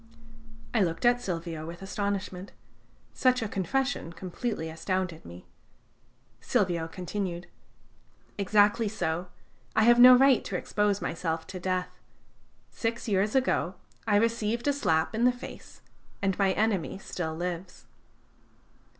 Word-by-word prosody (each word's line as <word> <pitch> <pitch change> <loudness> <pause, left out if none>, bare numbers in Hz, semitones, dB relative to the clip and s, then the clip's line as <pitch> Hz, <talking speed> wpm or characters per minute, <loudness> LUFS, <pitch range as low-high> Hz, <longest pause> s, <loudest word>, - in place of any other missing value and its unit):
I 225 - +3
looked 165 +2 0
at 245 0 +4
Silvio 165 -4 -4
with 170 +3 -8
astonishment. 195 -1 -3 0.6
Such 255 -2 +2
a - - -2
confession 200 - -1
completely 180 +1 -4
astounded 165 +1 -3
me. 85 +1 -11 0.9
Silvio 175 -4 0
continued: 180 0 -4 0.9
"Exactly 205 +2 +3
so: 180 -4 -2 0.5
I 220 - +4
have 240 +1 +6
no 250 +1 +10
right 265 -1 +5
to - - -4
expose 205 -1 0
myself 165 -1 -2
to 185 - -7
death. 185 0 -2 0.7
Six 230 +1 -3
years 205 +1 +1
ago 250 -8 +1 0.3
I 210 - +3
received 230 +2 +1
a 285 - +4
slap 160 - +1
in 225 +2 0
the 250 - +6
face, 245 +1 -11 0.4
and 195 -2 0
my 195 -1 +3
enemy 205 -5 0
still 165 -4 -4
lives." 180 +1 -5
195 Hz, 125 wpm, -28 LUFS, 170-225 Hz, 0.9 s, no